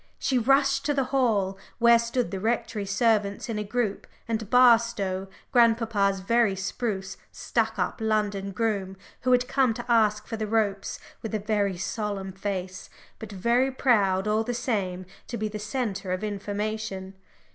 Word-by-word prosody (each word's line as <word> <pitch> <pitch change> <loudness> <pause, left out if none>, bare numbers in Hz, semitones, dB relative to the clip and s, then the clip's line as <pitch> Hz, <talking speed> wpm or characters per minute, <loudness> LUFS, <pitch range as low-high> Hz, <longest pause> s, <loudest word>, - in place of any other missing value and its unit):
She 260 -2 +1
rushed 275 +3 +3
to 290 -1 +1
the 275 - +2
hall, 205 -7 +1 0.2
where 235 0 +6
stood 235 +1 -1
the 195 - -3
Rectory 225 -1 -1
servants 205 0 +1
in 215 -2 -2
a - - -2
group, 215 -1 -2 0.2
and 220 -2 -2
Barstow, 230 -6 +4 0.2
grandpapa's 225 -5 +3
very 225 0 +2
spruce, 195 -1 -3
stuck 225 -2 -1
up 180 -2 -1
London 210 -3 0
groom, 195 -2 -2 0.2
who 255 - 0
had 250 0 +3
come 255 -5 +2
to 240 - -6
ask 215 -3 +3
for 225 - -5
the 215 0 -3
ropes, 205 -3 0 0.2
with 220 -1 -4
a - - 0
very 205 -2 0
solemn 195 0 -3
face, 185 -1 -5 0.3
but 220 -2 -8
very 235 +7 +2
proud, 210 -7 +2
all 215 +1 +2
the 245 +2 -3
same, 185 -7 -2 0.2
to 240 - -4
be 215 - -1
the 210 0 -6
centre 210 -4 -3
of 185 +2 -2
information. 205 -1 -4
215 Hz, 160 wpm, -26 LUFS, 195-235 Hz, 0.3 s, where